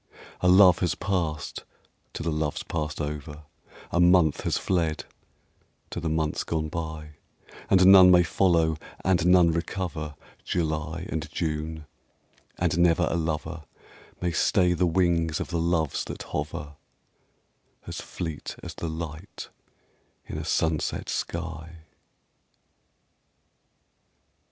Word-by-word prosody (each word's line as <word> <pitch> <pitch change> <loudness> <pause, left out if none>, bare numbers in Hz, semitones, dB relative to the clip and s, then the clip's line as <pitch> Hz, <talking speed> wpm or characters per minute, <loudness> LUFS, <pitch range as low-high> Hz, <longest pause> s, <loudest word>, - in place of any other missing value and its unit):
A 90 - +1
love 90 -1 +7
has 90 - 0
passed 85 -7 -2 0.5
to - - -5
the 85 - -1
loves 75 -1 -2
passed 75 -2 -4
over, 75 0 -5 0.5
A 85 - +1
month 90 -3 +4
has - - 0
fled 85 -4 -1 0.9
to - - -4
the 80 - -2
months 80 -1 -1
gone 80 -1 -2
by; 80 -2 -5 0.6
And 95 -1 +5
none 95 -1 +9
may 90 -1 +7
follow, 85 -3 +2 0.3
and 90 -2 +3
none 90 -2 +6
recover 85 -2 -4 0.3
July 80 0 -2
and 80 -2 -4
June, 80 -1 -3 0.7
and 85 - 0
never 85 0 +4
a - - 0
lover 80 0 -3 0.6
May 90 -1 0
stay 90 +2 +3
the 90 +1 +1
wings 85 -2 +1
of - - -4
the 85 - -1
Loves 85 -4 0
that - - -6
hover, 75 -1 -5 1.1
As - - -6
fleet 80 -5 -6
as - - -6
the 85 - -5
light 80 +2 -7 0.8
in - - -7
a - - -4
sunset 80 -2 -1
sky. 80 -1 -5
80 Hz, 120 wpm, -26 LUFS, 80-90 Hz, 1.1 s, none